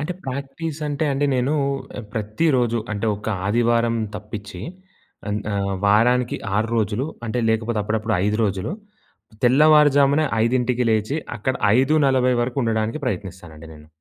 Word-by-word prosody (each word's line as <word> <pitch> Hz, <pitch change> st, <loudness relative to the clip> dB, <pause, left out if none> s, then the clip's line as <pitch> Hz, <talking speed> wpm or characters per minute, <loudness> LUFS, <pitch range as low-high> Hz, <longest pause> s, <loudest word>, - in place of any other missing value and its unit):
అంటే 150 Hz, +5 st, -3 dB
ప్రాక్టీస్ 140 Hz, +4 st, -5 dB
అంటే 145 Hz, +2 st, -1 dB
అండి, 140 Hz, +2 st, 0 dB
నేను 130 Hz, +4 st, +1 dB, 0.6 s
ప్రతిరోజు 120 Hz, +2 st, 0 dB
అంటే 105 Hz, +2 st, -2 dB
ఒక 105 Hz, -, -11 dB, 0.2 s
ఆదివారం 115 Hz, +1 st, +2 dB, 0.2 s
తప్పిచ్చి, 105 Hz, -3 st, -8 dB, 0.7 s
అన్ 105 Hz, +1 st, -1 dB
ఆహ్, 100 Hz, 0 st, -1 dB
వారానికి 120 Hz, +4 st, +3 dB, 0.2 s
6 110 Hz, +2 st, +1 dB
రోజులు, 110 Hz, +4 st, 0 dB, 0.2 s
అంటే 120 Hz, +2 st, -1 dB
లేకపోతే 110 Hz, 0 st, 0 dB
అప్పుడప్పుడు 110 Hz, +1 st, -1 dB
5 105 Hz, +1 st, 0 dB
రోజులు 95 Hz, -, -2 dB, 0.7 s
తెల్లవారుజామున 145 Hz, +1 st, +5 dB, 0.2 s
5కి 125 Hz, +1 st, +1 dB
లేచి, 110 Hz, +6 st, 0 dB, 0.2 s
అక్కడ 130 Hz, +5 st, -1 dB, 0.2 s
5:40 130 Hz, -2 st, +3 dB
వరకు 120 Hz, +2 st, -4 dB
ఉండడానికి 110 Hz, +2 st, -1 dB
ప్రయత్నిస్తానండి 85 Hz, -8 st, -6 dB
నేను. 75 Hz, 0 st, -15 dB
115 Hz, 125 wpm, -22 LUFS, 105-135 Hz, 0.7 s, తెల్లవారుజామున